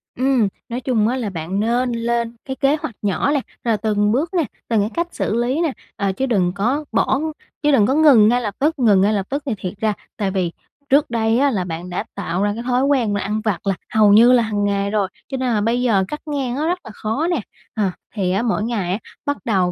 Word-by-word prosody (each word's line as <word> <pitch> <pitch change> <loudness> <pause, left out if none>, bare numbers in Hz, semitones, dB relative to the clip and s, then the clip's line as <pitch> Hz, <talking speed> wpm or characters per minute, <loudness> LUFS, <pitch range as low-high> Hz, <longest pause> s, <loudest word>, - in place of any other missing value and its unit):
Ừm, 255 -4 +2 0.2
nói 240 +2 -3
chung 230 -5 +1
á 245 - 0
là 230 -5 -2
bạn 180 +2 -3
nên 240 +3 +1
lên 235 0 -1
cái 265 - -4
kế 275 +2 +2
hoạch 300 -7 -6
nhỏ 205 +7 +1
nè. 290 -2 +1 0.2
Rồi 230 -3 +1
từng 210 0 +1
bước 295 - 0
nè, 345 -3 +2 0.2
từng 225 -2 +2
cái 205 - 0
cách 340 0 -1
xử 215 - -2
lý 245 +6 0
nè, 330 -4 +1 0.2
ờ, 200 -3 0
chứ 230 +8 -2
đừng 195 -8 +1
có 250 +10 0
bỏ 265 - +2 0.4
chứ 295 - +4
đừng 240 -7 +5
có 265 - +2
ngừng 280 -8 +6
ngay 245 +2 +3
lập 210 -4 -4
tức, 305 +1 +1
ngừng 210 -6 +5
ngay 205 +2 +3
lập 200 -2 -1
tức 280 +1 -2
thì 265 - -1
thiệt 185 -2 -5
ra 215 -1 +1 0.2
tại 200 -3 -1
vì 185 -3 -1 0.4
trước 285 +3 +4
đây 225 -1 +1
á 280 0 +3
là 195 -6 -1
bạn 175 0 -6
đã 180 - -2
tạo 190 -1 -2
ra 205 0 +1
cái 230 +3 -6
thói 250 +1 +1
quen 255 -7 +2
là 200 - -1
ăn 215 +2 -2
vặt 210 -3 -2
là 195 - +2 0.2
hầu 210 -2 +5
như 235 +4 +7
là 245 -2 +5
hàng 210 -2 -1
ngày 200 0 0
rồi, 205 -2 +1 0.2
cho 265 - -2
nên 255 -2 0
là 210 - +1
bây 230 +3 +1
giờ 220 -6 +3
cắt 300 - -6
ngang 275 -5 -2
nó 300 +3 -1
rất 355 +2 0
là - - -9
khó 225 +11 -2
nè. 330 -8 0 0.3
À 205 -4 0 0.2
thì 190 -4 0
á 195 +3 +1
mỗi 225 -3 0
ngày 215 -6 -1
á, 195 - -1 0.3
bắt 285 -1 0
đầu 190 -5 +2
225 Hz, 260 wpm, -20 LUFS, 205-265 Hz, 0.4 s, như